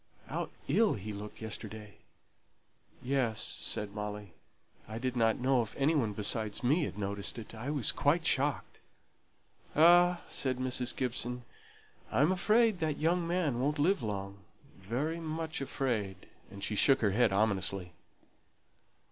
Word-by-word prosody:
How -, -, -4 dB, 0.2 s
ill 205 Hz, +9 st, +3 dB
he 105 Hz, +1 st, -6 dB
looked 105 Hz, +2 st, -8 dB
yesterday!" 110 Hz, -1 st, -6 dB, 1.0 s
"Yes," 125 Hz, -4 st, 0 dB
said 105 Hz, -2 st, -2 dB
Molly; 105 Hz, -2 st, -6 dB, 0.5 s
"I 110 Hz, +1 st, -6 dB
didn't 115 Hz, -2 st, +1 dB
know 130 Hz, 0 st, +3 dB
if 110 Hz, -, -6 dB
any 140 Hz, +4 st, +2 dB
one 115 Hz, -9 st, +1 dB
besides 105 Hz, +2 st, -1 dB
me 150 Hz, +6 st, +3 dB
had -, -, -7 dB
noticed 100 Hz, +1 st, -3 dB
it. 115 Hz, -1 st, -8 dB
I 115 Hz, +5 st, -5 dB
was 145 Hz, -6 st, +2 dB
quite 160 Hz, +4 st, +1 dB
shocked." 140 Hz, 0 st, 0 dB, 1.0 s
"Ah," 175 Hz, +2 st, +6 dB
said 130 Hz, -2 st, 0 dB
Mrs. 125 Hz, -1 st, 0 dB
Gibson, 125 Hz, -1 st, -2 dB, 0.7 s
"I'm 150 Hz, +7 st, +3 dB
afraid 215 Hz, +2 st, +3 dB
that 155 Hz, -3 st, -1 dB
young 170 Hz, +2 st, +1 dB
man 170 Hz, -8 st, 0 dB
won't 145 Hz, +4 st, 0 dB
live 170 Hz, +5 st, +2 dB
long 100 Hz, -2 st, -4 dB, 0.4 s
very 130 Hz, -, -3 dB
much 160 Hz, -1 st, -4 dB
afraid," 110 Hz, -9 st, -2 dB, 0.2 s
and 100 Hz, 0 st, -10 dB
she 110 Hz, -, -1 dB
shook 135 Hz, +6 st, +4 dB
her 105 Hz, -3 st, +3 dB
head 115 Hz, +1 st, +3 dB
ominously. 95 Hz, -3 st, 0 dB
125 Hz, 140 wpm, -32 LUFS, 105-150 Hz, 1.0 s, Ah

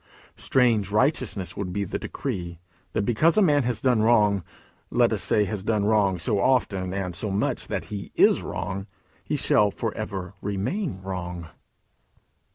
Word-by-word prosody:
Strange 115 Hz, -6 st, +2 dB
righteousness 105 Hz, -, 0 dB
would 95 Hz, -3 st, -4 dB
be 100 Hz, +2 st, -1 dB
the 100 Hz, -, -4 dB
decree, 90 Hz, -10 st, -5 dB, 0.4 s
that -, -, 0 dB
because 155 Hz, -, +2 dB
a -, -, +6 dB
man 145 Hz, -5 st, +4 dB
has 125 Hz, -2 st, -2 dB
done 125 Hz, -4 st, +3 dB
wrong 105 Hz, -4 st, +3 dB, 0.5 s
let -, -, +3 dB
us -, -, -1 dB
say 105 Hz, -, +2 dB
has 100 Hz, +1 st, -4 dB
done 105 Hz, 0 st, 0 dB
wrong 105 Hz, -3 st, +3 dB
so 100 Hz, +4 st, 0 dB
often 100 Hz, -6 st, +1 dB
and 95 Hz, -2 st, -3 dB
so 105 Hz, +5 st, -3 dB
much 100 Hz, +2 st, -1 dB
that -, -, -3 dB
he 100 Hz, -1 st, -6 dB
is -, -, +5 dB
wrong 95 Hz, +1 st, -4 dB, 0.4 s
he -, -, -2 dB
shall 105 Hz, -1 st, +3 dB
for 110 Hz, +2 st, -3 dB
ever 95 Hz, -3 st, -5 dB
remain 105 Hz, -, -2 dB
wrong! 90 Hz, -3 st, -5 dB
100 Hz, 165 wpm, -25 LUFS, 95-120 Hz, 0.5 s, a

